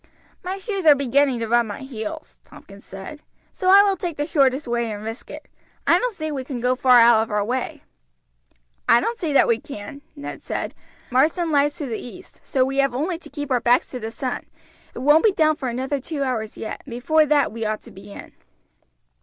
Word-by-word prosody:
"My 370 +2 -3
shoes 390 -4 -3
are 295 - +9
beginning 275 -1 +2
to 225 - -2
rub 235 0 +2
my 205 - -7
heels," 270 +5 -7
Tompkins 200 +1 -15
said, 195 +10 -10 0.3
"so 370 - -1
I 395 +1 +8
will 400 -1 +2
take 350 -5 -5
the 290 - -1
shortest 275 -2 +2
way 235 -1 -1
and 210 0 -6
risk 225 +2 -7
it. - - -10 0.4
I - - +5
don't - - -2
see 310 -2 -4
we 270 -3 -3
can 255 -2 -5
go 250 +2 +1
far 250 -1 +5
out 230 -1 +6
of 220 - -3
our 210 -1 0
way." 250 +3 -3 1.1
"I 235 - +7
don't 465 - -2
see 325 -5 -2
that - - +5
we 230 -1 +2
can," 250 +2 -9
Ned 285 - -7
replied. - - -4 0.4
"Marsden 315 +6 +2
lies 290 0 +2
to 305 - -5
the 230 -4 -4
east, 360 +10 -12
so 260 -1 +1
we 270 +1 -3
have 275 -3 +2
only 325 +6 -2
to - - -14
keep 290 -1 -6
our 250 -2 +2
backs 245 +2 +3
to 250 - -5
the 220 -1 -5
sun; 250 +3 -5 0.5
it - - -6
won't 295 +3 +5
be 435 -3 +4
down 310 -3 +3
for 270 -5 -4
another 265 +3 -2
two 290 0 -3
hours 225 -5 -3
yet, 220 - -6
and - - -13
before 305 +6 +2
that 290 -1 +3
we 225 +1 -5
ought 215 0 -2
to - - -15
be 195 +1 -13
in." - - -10
270 Hz, 225 wpm, -22 LUFS, 235-310 Hz, 1.1 s, are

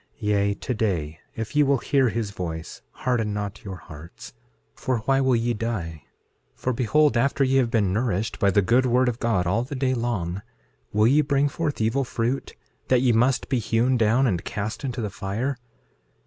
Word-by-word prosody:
6:6 - - -39
Yea, 100 -1 +2
today, 95 - -2 0.2
if 115 +3 -5
ye 150 - +5
will 140 -1 +3
hear 135 0 +2
his 110 -2 -3
voice, 80 -4 -6
harden 115 -5 -1
not 100 -1 -5
your 95 -2 -6
hearts; 85 +8 -12 0.4
for 130 -2 -1
why 135 0 +3
will 130 -2 +3
ye 120 +1 +1
die? 100 -9 -4 0.5
6:7 - - -32
For 130 - -1
behold, 130 +3 +3
after 140 +3 +2
ye 135 0 +2
have 125 -3 +3
been 105 -5 +1
nourished 110 -1 -1
by 100 - +4
the 100 +1 +3
good 125 +6 +3
word 125 +1 +3
of 120 -1 -1
God 110 -7 +1
all 100 +6 +1
the 130 +4 -5
day 130 0 +1
long, 100 -7 -2 0.5
will 105 +1 +3
ye 140 +6 +5
bring 140 -1 +2
forth 150 0 -3
evil 115 +5 +1
fruit, 120 +2 -2 0.3
that 130 -1 +3
ye 125 - +4
must 120 +3 +2
be 130 -3 +1
hewn 115 +3 +1
down 120 +3 +3
and 90 -8 0
cast 105 +5 -4
into 125 -3 -3
the 105 -2 -3
fire? 110 +8 -3
115 Hz, 195 wpm, -24 LUFS, 100-130 Hz, 0.5 s, ye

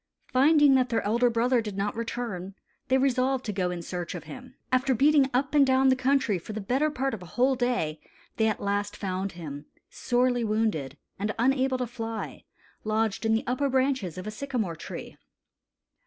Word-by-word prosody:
Finding 290 +2 +6
that 255 -1 +3
their 230 - 0
elder 235 +4 +2
brother 235 +1 +2
did 210 -3 -6
not 205 +1 -1
return, 225 -5 -4 0.3
they 260 - +3
resolved 260 0 +1
to 210 - -2
go 185 -2 0
in 175 -1 -5
search 175 0 -5
of - - -6
him. 255 0 -11 0.2
After 255 +1 +2
beating 280 +2 +4
up 270 +3 0
and 290 -1 +6
down 265 0 +4
the 260 - +4
country 255 -6 +1
for 215 - -8
the 215 - -4
better 260 +9 +1
part 270 -3 -2
of 215 - -5
a 180 - -10
whole 255 +10 +2
day, 240 -12 -1 0.4
they 220 -1 +3
last 205 0 -2
found 190 0 -3
him, 150 -4 -8 0.2
sorely 245 0 +1
wounded 210 - -1 0.2
and 210 +1 -2
unable 260 +2 +2
to 250 - -1
fly, 225 -2 -6 0.4
lodged 220 0 0
in 220 - +3
the 225 - -1
upper 255 +3 0
branches 260 - 0
of 185 - -6
a 215 - -4
sycamore 220 -7 -3
tree. - - -8
240 Hz, 185 wpm, -27 LUFS, 205-260 Hz, 0.4 s, Finding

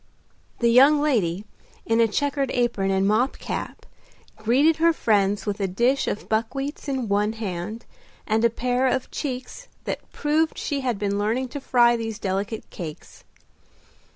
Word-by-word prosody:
The 235 0 +4
young 275 +5 +6
lady, 210 - 0 0.4
in 225 0 +2
a 230 - +5
checked 280 +4 -1
apron 235 -6 +1
and 190 0 +2
mob 230 +6 +1
cap, - - -5 0.5
greeted 265 +9 +3
her 335 +1 +4
friends 205 -7 +1
with 205 -1 -2
a 195 - 0
dish 240 +9 +1
of 205 - -3
buckwheats 270 +8 -2
in 260 -4 -2
one 205 +2 +1
hand, 215 0 -5 0.4
and 220 +1 +1
a 235 - +5
pair 250 +3 0
of 260 0 -1
cheeks 265 - -5 0.2
that - - -5
proved 310 +2 0
she 285 -2 -2
had 250 -5 -1
been 200 0 -1
learning 235 +5 0
to 285 +2 -6
fry 240 -2 +4
these 225 -2 -4
delectable 200 +2 -3
cakes. 160 -5 -9
230 Hz, 155 wpm, -24 LUFS, 205-265 Hz, 0.5 s, young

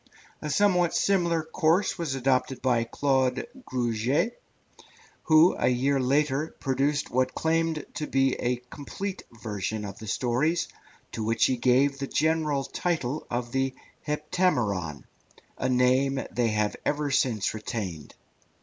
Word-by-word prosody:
A 150 - -4
somewhat 180 +1 +3
similar 170 -5 +2
course 160 +4 +1
was 155 -6 -2
adopted 130 -1 +1
by 120 -3 +1
Claude 130 - +1 0.2
Gruget, 125 - 0 0.8
who, 160 +2 +6
a - - +2
year 135 +3 +2
later, 140 +3 +1
produced 140 +2 0
what 130 +1 +1
claimed 160 -1 0
to 150 - -4
be 135 -1 +2
a 125 0 -1
complete 190 +7 -5 0.2
version 105 0 -3
of 100 -1 -8
the 110 - -9
stories, 135 - 0 0.4
to 110 - -4
which 115 +1 +2
he 130 - +2
gave 130 +3 +2
the 135 - -3
general 155 -2 +1
title 155 -1 -2
of 120 0 -3
the 135 0 0 0.3
Heptameron, 125 - 0 0.6
a 130 - 0
name 130 +2 +2
they 120 -1 +1
have 105 -1 0
ever 145 -1 0
since 115 -6 +1
retained. 105 - -5
135 Hz, 130 wpm, -27 LUFS, 120-155 Hz, 0.8 s, who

